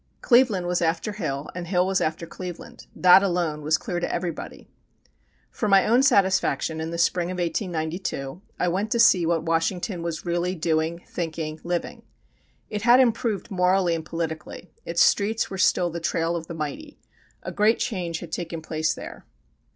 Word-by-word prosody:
Cleveland 235 -8 +4
was 175 0 0
after 170 +5 0
Hill 155 -8 -4
and 175 -1 -6
Hill 180 0 +2
was 190 0 +1
after 160 +2 -2
Cleveland; 180 0 -9
that 185 +1 +7
alone 175 -5 -1
was 155 +2 +2
clear 180 -7 -4
to 175 - -2
everybody. 175 -2 -5 0.8
For 215 - -2
my 195 -1 +5
own 240 +4 +4
satisfaction, 190 - +2
in 160 - -3
the 170 - -4
spring 175 +1 +1
of 185 - -4
1892, 170 -3 -3 0.2
I 180 - +1
went 195 +5 -1
to 235 - 0
see 185 -7 +5
what 165 -1 +1
Washington 170 +3 -1
was 170 0 -4
really 175 +1 -1
doing, 165 +1 -1
thinking, 160 -2 -4
living. 175 0 -3 0.7
It 210 -1 -4
had 240 +3 +6
improved 230 -4 +1
morally 180 -1 +2
and 165 -1 -3
politically, 160 +1 -5 0.2
its 170 0 +3
streets 215 +2 +1
were 190 - -5
still 175 -1 +3
the 170 - -4
trail 165 0 -1
of 165 -1 -5
the 170 - -7
mighty. 165 - -6 0.5
A - - -5
great 215 +2 +3
change 180 -8 -3
had 170 - -9
taken 165 -2 -5
place 155 0 -1
there. - - -10
175 Hz, 175 wpm, -24 LUFS, 165-190 Hz, 0.8 s, that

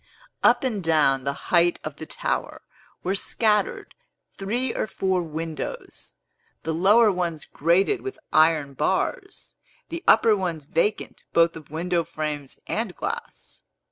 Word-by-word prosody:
Up - - +4
and 220 -7 -1
down 145 -5 +3
the 140 - 0 0.2
height 175 0 +5
of 150 -1 -6
the 160 - -8
tower - - -3 0.4
were 185 - 0
scattered 210 +1 0 0.4
three 235 +6 -2
or - - -2
four 190 -2 0
windows, 165 - -6 0.5
the 160 - -2
lower 205 +6 +5
ones 170 -5 -3
grated 185 - +1
with 395 -3 -6 0.2
iron 155 -3 +4
bars, 150 +7 -2 0.4
the 335 +2 -5
upper 220 0 +6
ones 170 -6 -3
vacant 170 +8 -1
both 170 0 +4
of 155 -3 -11
window 170 +2 -1
frames 150 -4 -5
and 220 -5 -3
glass. 470 +2 -6
175 Hz, 135 wpm, -24 LUFS, 155-210 Hz, 0.5 s, upper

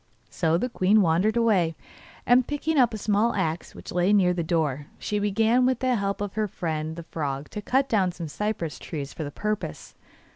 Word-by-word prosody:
So 165 -1 +1
the 245 - -1
queen 210 -3 +3
wandered 185 +7 +2
away, 190 -8 +2 0.5
and 245 0 +4
picking 295 +1 0
up 245 -3 +5
a 220 - -4
small 210 +2 +1
axe 160 +1 -2
which - - -9
lay 180 +3 +2
near 185 -3 +4
the 175 - -2
door 155 -4 -1
she 210 - -2
began 220 +4 +2
with 255 0 +2
the 255 0 +1
help 200 -3 -1
of 205 -2 -3
her 215 -1 0
friend 160 -3 -3
the 170 - -7
frog 145 -3 -4
to 210 - -5
cut 265 +5 +1
down 195 -7 +2
some 170 -2 -6
cypress 175 -2 -3
trees 145 -4 -6
for 160 - -5
the 145 - -4
purpose. 210 +7 -4
200 Hz, 205 wpm, -26 LUFS, 165-220 Hz, 0.5 s, up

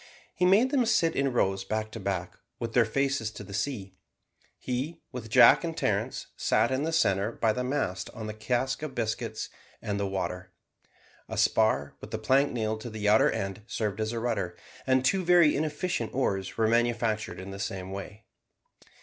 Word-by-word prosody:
He 180 - +2
made 220 +8 +5
them 260 -5 +2
sit 165 -5 +2
in 135 -1 +1
rows 95 -5 +1
back 110 +2 -3
to 115 - -7
back, 95 -3 -3 0.2
with 115 -1 -4
their 120 -2 +5
faces 135 0 0
to 105 - -8
the 100 0 -10
sea. 105 -3 -3 0.6
He, 135 +7 -3
with 120 -4 -7
Jack - - +7
and - - -4
Terence, - - -1
sat 115 +3 +2
in 130 +1 0
the 160 +2 -1
centre 100 -9 +2
by 115 -2 +1
the 125 - -2
mast 125 -9 -2
on 110 - -6
the 110 - -4
cask 125 +5 -1
of 150 -4 -5
biscuits 110 -1 -3 0.3
and 100 -1 -3
the 100 - 0
water. 95 -1 -3 0.8
A - - -5
spar, 110 -11 +2
with - - -9
a - - -1
plank 140 +2 +3
nailed 110 -2 -2
to 120 - -6
the 110 -2 -3
outer 105 +1 +5
end, 95 +2 -3
served 105 -2 -2
as 110 0 -1
a 115 - -3
rudder, 95 -7 -2 0.3
and 130 0 +3
two 190 +7 +2
very 175 -3 +5
inefficient 150 -5 -2
oars 95 -8 -1
were 110 -1 +3
manufactured 115 -3 0
in 95 +1 -7
the 100 - -7
same 95 -1 -4
way. 100 +3 -8
110 Hz, 190 wpm, -28 LUFS, 100-130 Hz, 0.8 s, Jack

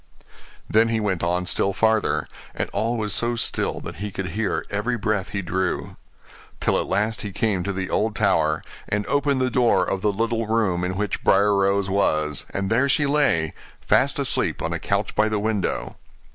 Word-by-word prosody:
Then 110 +2 +3
he 115 -1 +1
went 100 -5 -1
on 90 +1 0
still 100 +2 0
farther, 110 +1 +1 0.3
and - - -3
all 115 +2 -1
was 105 -2 -1
so 120 0 +1
still 115 - -1
that - - -7
he 105 +2 -4
could 95 -1 -4
hear 105 +2 -2
every 110 +5 -1
breath 105 -3 -1
he 100 -1 -3
drew; 95 +2 -2 0.6
till - - +1
at - - -2
last 105 +1 0
he 105 - -5
came 100 -2 0
to 100 +3 -2
the 95 -1 -4
old 110 0 0
tower, 75 0 +2 0.3
and 105 0 0
opened 140 -2 +1
the 130 0 +1
door 120 -1 +3
of 95 - -2
the 105 0 +2
little 115 +2 -1
room 105 -6 +1
in 90 +1 -2
which 105 0 -2
Briar 100 +1 +4
Rose 100 0 +2
was; 75 -7 +1
and 100 +1 -3
there 130 +5 +3
she 145 +2 +3
lay, 140 - +2 0.3
fast - - +2
asleep - - 0
on - - -1
a - - -2
couch - - -1
by 110 +1 +3
the 110 - 0
window. 100 - -2
105 Hz, 195 wpm, -23 LUFS, 95-115 Hz, 0.6 s, Briar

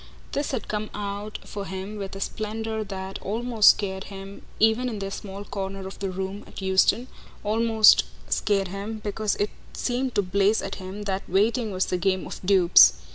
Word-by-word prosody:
This 285 +1 -1
had 255 -5 -3
come 215 0 -3
out 205 +1 -4
for 200 -1 -6
him 190 +3 -5
with 195 -1 -5
a - - -6
splendour 220 +1 -3
that 190 -1 -6
almost 225 +1 +4
scared 190 -1 +1
him 195 0 -9 0.2
even 225 +3 +3
in 220 - -4
their 195 -1 -4
small 195 0 -6
corner 195 -1 -5
of 190 - -8
the 195 - -2
room 190 +2 -4
at - - -10
Euston 190 +5 +3 0.4
almost 220 - +5 0.2
scared 195 - +1
him 200 +3 -5
because 210 0 -1
it 205 - -1 0.2
just - - -6
seemed 250 +1 -1
to 205 - +3
blaze 200 +3 +2
at - - -4
him 190 +3 -6
that 195 -1 -3
waiting 215 +4 +2
was 185 0 0
the 180 - -1
game 190 +1 +1
of - - -8
dupes. 180 - +7
200 Hz, 185 wpm, -25 LUFS, 190-215 Hz, 0.4 s, dupes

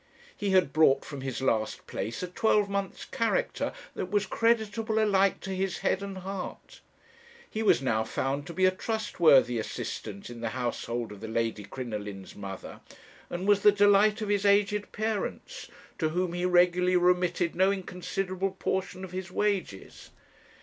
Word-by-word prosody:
He 205 - -2
had 185 -7 +3
brought 155 -3 +4
from 140 -3 -7
his 130 -1 -4
last 110 -4 0
place 115 +10 -4
a - - -2
twelvemonth's 200 0 0
character 235 - -1 0.2
that 185 - -4
was 205 0 +1
creditable 220 0 +1
alike 200 -3 +3
to 195 - -5
his 190 -1 -1
head 190 - +2
and 195 -1 -6
heart; 190 0 -7 0.7
he 220 - -4
was 200 - +3
now 110 -4 +1
found 135 +5 -2
to 170 - -7
be 185 - +3
a 185 - +5
trustworthy 170 - +3
assistant 105 0 -5
in 120 -1 -9
the 115 - -1
household 120 -1 -3
of 105 - -10
the 110 - -5
Lady 115 -1 -1
Crinoline's 105 -4 -6
mother, 95 -1 -8 0.5
and 180 +3 -4
was 205 -1 +4
the 210 - +7
delight 205 +1 +4
of 210 - -3
his 205 -1 +1
aged 205 0 +2
parents, 220 - -3 0.3
to 155 - +1
whom 175 +1 -1
he 175 +1 -1
regularly 180 0 +4
remitted 180 -1 +2
no 190 +2 +4
inconsiderable 185 0 -3
portion 190 0 -2
of 185 - -7
his 185 0 -5
wages. 190 - -2
185 Hz, 160 wpm, -28 LUFS, 135-200 Hz, 0.7 s, the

